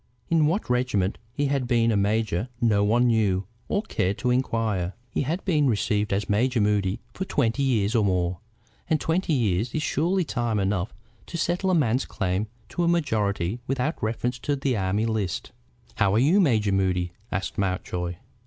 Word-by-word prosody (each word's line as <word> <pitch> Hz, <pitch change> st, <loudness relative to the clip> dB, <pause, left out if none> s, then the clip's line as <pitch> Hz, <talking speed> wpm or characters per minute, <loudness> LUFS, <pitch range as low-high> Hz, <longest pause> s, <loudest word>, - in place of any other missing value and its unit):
In 160 Hz, -2 st, +4 dB
what 185 Hz, +8 st, 0 dB
regiment 125 Hz, -6 st, 0 dB
he 145 Hz, +4 st, -1 dB
had 135 Hz, -3 st, 0 dB
been 115 Hz, -2 st, +3 dB
a -, -, +1 dB
major 105 Hz, +1 st, 0 dB
no 110 Hz, -4 st, +3 dB
one 115 Hz, +4 st, +3 dB
knew 105 Hz, -5 st, +2 dB, 0.2 s
or 200 Hz, -, 0 dB
cared 100 Hz, -, -1 dB
to 125 Hz, +2 st, 0 dB
inquire. 110 Hz, -7 st, 0 dB, 0.2 s
He -, -, 0 dB
had 160 Hz, +7 st, -2 dB
been 155 Hz, -7 st, +3 dB
received 105 Hz, -2 st, 0 dB
as 100 Hz, +1 st, 0 dB
Major 120 Hz, +4 st, +2 dB
Moody 105 Hz, 0 st, +1 dB
for 190 Hz, -, -3 dB
twenty 140 Hz, -7 st, 0 dB
years 115 Hz, -6 st, +1 dB
or 115 Hz, -3 st, +3 dB
more, 90 Hz, -2 st, 0 dB, 0.5 s
and 155 Hz, -, +2 dB
twenty 170 Hz, +2 st, 0 dB
years 110 Hz, -3 st, 0 dB
is 155 Hz, -, 0 dB
surely 175 Hz, +7 st, +1 dB
time 120 Hz, -6 st, -1 dB
enough 95 Hz, 0 st, 0 dB, 0.4 s
to 170 Hz, -, -5 dB
settle 175 Hz, +3 st, 0 dB
a 185 Hz, -, +3 dB
man's 130 Hz, -4 st, +2 dB
claim 95 Hz, +4 st, -1 dB, 0.2 s
to 175 Hz, -, -1 dB
a -, -, +2 dB
majority 110 Hz, -, 0 dB
without 135 Hz, +4 st, -1 dB
reference 120 Hz, +3 st, -1 dB
to 145 Hz, +3 st, -1 dB
the 135 Hz, -2 st, 0 dB
Army 100 Hz, +2 st, 0 dB
List. 110 Hz, -6 st, -2 dB, 0.5 s
"How 100 Hz, +1 st, +3 dB
are -, -, +4 dB
you, 150 Hz, -, +4 dB
Major 110 Hz, -, +2 dB
Moody?" 90 Hz, -2 st, +1 dB, 0.2 s
asked 95 Hz, -, -3 dB
Mountjoy. 90 Hz, -2 st, -2 dB
115 Hz, 180 wpm, -25 LUFS, 100-135 Hz, 0.5 s, In